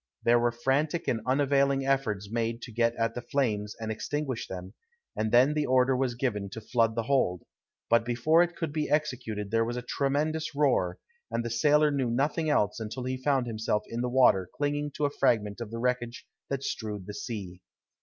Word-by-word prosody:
There 120 Hz, +1 st, +5 dB
were 120 Hz, 0 st, +2 dB
frantic 140 Hz, +7 st, 0 dB
and 115 Hz, -3 st, 0 dB
unavailing 140 Hz, 0 st, +2 dB
efforts 120 Hz, -8 st, 0 dB
made 115 Hz, 0 st, -2 dB
to 120 Hz, -, -8 dB
get 115 Hz, +1 st, +1 dB
at 115 Hz, 0 st, 0 dB
the 120 Hz, -, -5 dB
flames 105 Hz, -8 st, -1 dB
and 110 Hz, -1 st, -3 dB
extinguish 130 Hz, +3 st, -3 dB
them; 95 Hz, +1 st, -7 dB, 0.4 s
and 110 Hz, 0 st, -1 dB
then 130 Hz, +5 st, +5 dB
the 150 Hz, -1 st, 0 dB
order 130 Hz, +1 st, +3 dB
was 125 Hz, -2 st, 0 dB
given 105 Hz, -6 st, -2 dB
to -, -, -5 dB
flood 115 Hz, 0 st, +1 dB
the 115 Hz, -, 0 dB
hold, 110 Hz, -9 st, +1 dB, 0.4 s
but 115 Hz, 0 st, +4 dB
before 120 Hz, +8 st, +3 dB
it 175 Hz, 0 st, 0 dB
could 160 Hz, -4 st, -4 dB
be 155 Hz, -1 st, -1 dB
executed 120 Hz, -9 st, -1 dB
there 115 Hz, 0 st, +3 dB
was 120 Hz, +2 st, -3 dB
a 125 Hz, -, -4 dB
tremendous 150 Hz, +4 st, -1 dB
roar, 130 Hz, -12 st, +2 dB, 0.3 s
and 120 Hz, -, -2 dB
the 115 Hz, -, -3 dB
sailor 150 Hz, +5 st, +4 dB
knew 135 Hz, -4 st, 0 dB
nothing 145 Hz, +6 st, 0 dB
else 105 Hz, -8 st, +1 dB
until 110 Hz, +3 st, -5 dB
he 130 Hz, +1 st, -2 dB
found 130 Hz, 0 st, +1 dB
himself 110 Hz, -2 st, -1 dB
in 115 Hz, +1 st, -3 dB
the 125 Hz, -, -1 dB
water 120 Hz, -8 st, +4 dB
clinging 145 Hz, 0 st, -1 dB
to 150 Hz, -, 0 dB
a 145 Hz, -, 0 dB
fragment 105 Hz, -5 st, +1 dB
of 115 Hz, -, -5 dB
the 115 Hz, -, -6 dB
wreckage 120 Hz, 0 st, -2 dB, 0.2 s
that 140 Hz, -1 st, -2 dB
strewed 105 Hz, -7 st, -4 dB
the 105 Hz, -, -7 dB
sea. 100 Hz, -4 st, -6 dB
120 Hz, 200 wpm, -28 LUFS, 110-140 Hz, 0.4 s, There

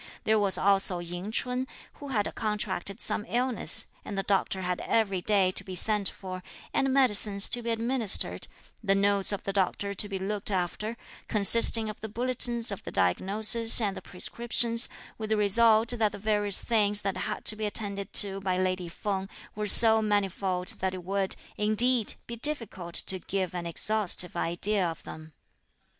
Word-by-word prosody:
There 220 Hz, 0 st, +1 dB
was 200 Hz, -2 st, +1 dB
also 195 Hz, -2 st, +1 dB
Ying 175 Hz, +4 st, -7 dB
Ch'un, 250 Hz, +3 st, -3 dB, 0.3 s
who 285 Hz, -, -9 dB
had 220 Hz, -7 st, -3 dB
contracted 205 Hz, -3 st, -4 dB
some -, -, -3 dB
illness, 250 Hz, 0 st, 0 dB, 0.2 s
and 200 Hz, -, -8 dB
the 195 Hz, -, -2 dB
doctor 190 Hz, -1 st, -2 dB
had 180 Hz, 0 st, -3 dB
every 200 Hz, -5 st, -1 dB
day 195 Hz, -2 st, +1 dB
to -, -, -6 dB
be 185 Hz, -, -9 dB
sent 210 Hz, +1 st, -1 dB
for, 185 Hz, -1 st, -9 dB, 0.3 s
and 270 Hz, -1 st, 0 dB
medicines 210 Hz, -6 st, +4 dB
to 245 Hz, -, +3 dB
be 235 Hz, -, -5 dB
administered, 230 Hz, -1 st, +3 dB, 0.4 s
the 195 Hz, -1 st, +1 dB
notes 200 Hz, 0 st, +2 dB
of 200 Hz, -, -5 dB
the 195 Hz, -, -5 dB
doctor 200 Hz, +1 st, -2 dB
to 205 Hz, +1 st, -1 dB
be 195 Hz, -, -4 dB
looked 200 Hz, +2 st, -3 dB
after, 205 Hz, +4 st, -4 dB, 0.3 s
consisting 220 Hz, +2 st, +6 dB
of 215 Hz, -, -9 dB
the 220 Hz, -, -7 dB
bulletins 240 Hz, 0 st, 0 dB
of 200 Hz, -, -8 dB
the -, -, -8 dB
diagnosis 210 Hz, -, +4 dB
and 205 Hz, -4 st, -2 dB
the -, -, -9 dB
prescriptions, 230 Hz, +4 st, +1 dB, 0.3 s
with 215 Hz, -1 st, -6 dB
the 220 Hz, -, 0 dB
result 220 Hz, +2 st, +3 dB
that 225 Hz, -4 st, 0 dB
the -, -, -8 dB
various 205 Hz, -1 st, 0 dB
things 210 Hz, -3 st, 0 dB
that 195 Hz, -2 st, -4 dB
had -, -, -5 dB
to 215 Hz, -, +3 dB
be 215 Hz, 0 st, -4 dB
attended 200 Hz, -2 st, -3 dB
to 195 Hz, -2 st, +2 dB
by 185 Hz, -2 st, -2 dB
lady 185 Hz, -1 st, -3 dB
Feng 195 Hz, +2 st, -5 dB, 0.2 s
were 210 Hz, 0 st, -4 dB
so 220 Hz, +2 st, +6 dB
manifold 195 Hz, -3 st, -2 dB
that 190 Hz, 0 st, -3 dB
it 180 Hz, -, -9 dB
would, 195 Hz, +1 st, -2 dB, 0.2 s
indeed, 215 Hz, +2 st, +1 dB
be 235 Hz, -, -8 dB
difficult 230 Hz, -, -3 dB
to 190 Hz, -, -1 dB
give 185 Hz, 0 st, -4 dB
an 175 Hz, -1 st, -6 dB
exhaustive 185 Hz, 0 st, +1 dB
idea 190 Hz, +4 st, 0 dB
of 165 Hz, -2 st, -5 dB
them. 155 Hz, 0 st, -12 dB
205 Hz, 175 wpm, -26 LUFS, 190-220 Hz, 0.4 s, consisting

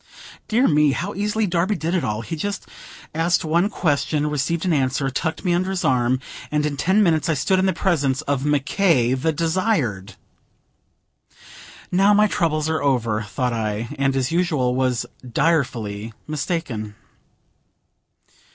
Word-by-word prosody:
Dear 240 Hz, +5 st, +3 dB
me! 150 Hz, -2 st, +4 dB
how 185 Hz, +8 st, -3 dB
easily 210 Hz, +2 st, 0 dB
Darby 180 Hz, +2 st, 0 dB
did 165 Hz, 0 st, -2 dB
it 180 Hz, -, +1 dB
all: 105 Hz, +1 st, -2 dB
he 165 Hz, +8 st, -5 dB
just 200 Hz, +6 st, -4 dB, 0.5 s
asked 165 Hz, +2 st, +1 dB
one 170 Hz, +5 st, +2 dB
question, 150 Hz, -4 st, 0 dB
received 160 Hz, +4 st, -1 dB
an 180 Hz, -, +2 dB
answer, 135 Hz, -1 st, 0 dB
tucked 160 Hz, +7 st, -3 dB
me 175 Hz, -, +2 dB
under 185 Hz, +2 st, 0 dB
his 190 Hz, -2 st, -2 dB
arm, 125 Hz, 0 st, +2 dB, 0.3 s
and 150 Hz, 0 st, 0 dB
in 150 Hz, -1 st, -1 dB
ten 190 Hz, +8 st, +3 dB
minutes 165 Hz, -3 st, +2 dB
I 160 Hz, -, +2 dB
stood 185 Hz, +6 st, +1 dB
in 190 Hz, -, +2 dB
the -, -, +3 dB
presence 150 Hz, -7 st, 0 dB
of 140 Hz, -3 st, -1 dB
Mc 145 Hz, -2 st, +1 dB
K., 150 Hz, -, +2 dB
the 135 Hz, +5 st, 0 dB
Desired. 160 Hz, -, -1 dB, 1.8 s
"Now 195 Hz, +3 st, +4 dB
my 210 Hz, +1 st, +5 dB
troubles 160 Hz, -6 st, 0 dB
are 160 Hz, -2 st, -1 dB
over," 115 Hz, -6 st, +1 dB
thought 115 Hz, +4 st, -2 dB
I, 110 Hz, 0 st, -2 dB
and 135 Hz, -1 st, +1 dB
as 135 Hz, +2 st, 0 dB
usual 155 Hz, -8 st, +1 dB
was 130 Hz, -2 st, 0 dB, 0.3 s
direfully 115 Hz, -9 st, 0 dB
mistaken. 140 Hz, -, -3 dB
150 Hz, 155 wpm, -22 LUFS, 130-175 Hz, 1.8 s, my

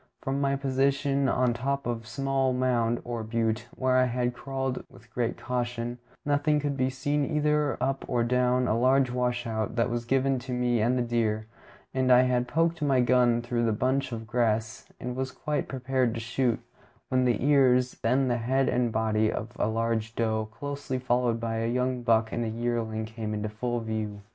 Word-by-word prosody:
From 135 Hz, +1 st, -1 dB
my 140 Hz, 0 st, +2 dB
position 140 Hz, 0 st, +1 dB
on 125 Hz, 0 st, +2 dB
top 140 Hz, +3 st, -2 dB
of 120 Hz, -1 st, -2 dB
a 115 Hz, -, -16 dB
small 135 Hz, +1 st, 0 dB
mound, 120 Hz, -2 st, +1 dB
or 120 Hz, -1 st, -4 dB
butte, 110 Hz, 0 st, -1 dB
where 130 Hz, 0 st, +2 dB
I 130 Hz, -, +5 dB
had 125 Hz, 0 st, -1 dB
crawled 135 Hz, 0 st, -3 dB
with 115 Hz, +1 st, -18 dB
great 120 Hz, -2 st, -1 dB
caution, 120 Hz, -1 st, -3 dB, 0.3 s
nothing 145 Hz, +1 st, +2 dB
could 145 Hz, -1 st, -2 dB
be 130 Hz, -1 st, +1 dB
seen 145 Hz, +3 st, -1 dB
either 150 Hz, -1 st, +1 dB
up 135 Hz, 0 st, -1 dB
or 120 Hz, -2 st, +1 dB
down 125 Hz, +1 st, +2 dB
a 110 Hz, -, +2 dB
large 130 Hz, +2 st, +3 dB
washout 120 Hz, -3 st, -1 dB
that 120 Hz, 0 st, +1 dB
was 120 Hz, 0 st, -2 dB
between 130 Hz, -1 st, 0 dB
me 120 Hz, -2 st, +2 dB
and 120 Hz, +3 st, +2 dB
the 125 Hz, -, +1 dB
deer; 110 Hz, -2 st, 0 dB, 0.5 s
and 130 Hz, -1 st, +2 dB
I 125 Hz, 0 st, +7 dB
had 125 Hz, -1 st, +1 dB
poked 165 Hz, +2 st, +1 dB
my 140 Hz, -3 st, +3 dB
gun 120 Hz, -1 st, +3 dB
through 120 Hz, -1 st, 0 dB
a -, -, +1 dB
bunch 130 Hz, +4 st, 0 dB
of 115 Hz, -1 st, -5 dB
grass, 110 Hz, -1 st, -1 dB
and 125 Hz, 0 st, -4 dB
was 130 Hz, 0 st, -2 dB
quite 150 Hz, +3 st, -2 dB
prepared 130 Hz, -2 st, 0 dB
to -, -, -3 dB
shoot, 120 Hz, +1 st, 0 dB, 0.5 s
when 130 Hz, 0 st, +2 dB
the 120 Hz, 0 st, +1 dB
ears, 130 Hz, -3 st, +4 dB
then 130 Hz, +3 st, +2 dB
the 120 Hz, -1 st, +1 dB
head 130 Hz, +3 st, +1 dB
and 125 Hz, -2 st, +1 dB
body, 110 Hz, -1 st, +1 dB
of 110 Hz, -, -4 dB
a -, -, +2 dB
large 115 Hz, 0 st, -1 dB
doe, 110 Hz, -1 st, 0 dB
closely 140 Hz, +2 st, -4 dB
followed 125 Hz, -2 st, +1 dB
by 115 Hz, -1 st, -2 dB
a 115 Hz, +1 st, 0 dB
young 125 Hz, 0 st, 0 dB
buck 115 Hz, -1 st, +2 dB
and 120 Hz, -, -1 dB
a 115 Hz, -, -2 dB
yearling, 115 Hz, -1 st, -2 dB
came 110 Hz, -1 st, -5 dB
into 105 Hz, 0 st, -3 dB
full 120 Hz, +3 st, -2 dB
view. 110 Hz, -2 st, -4 dB
125 Hz, 190 wpm, -28 LUFS, 115-130 Hz, 0.5 s, I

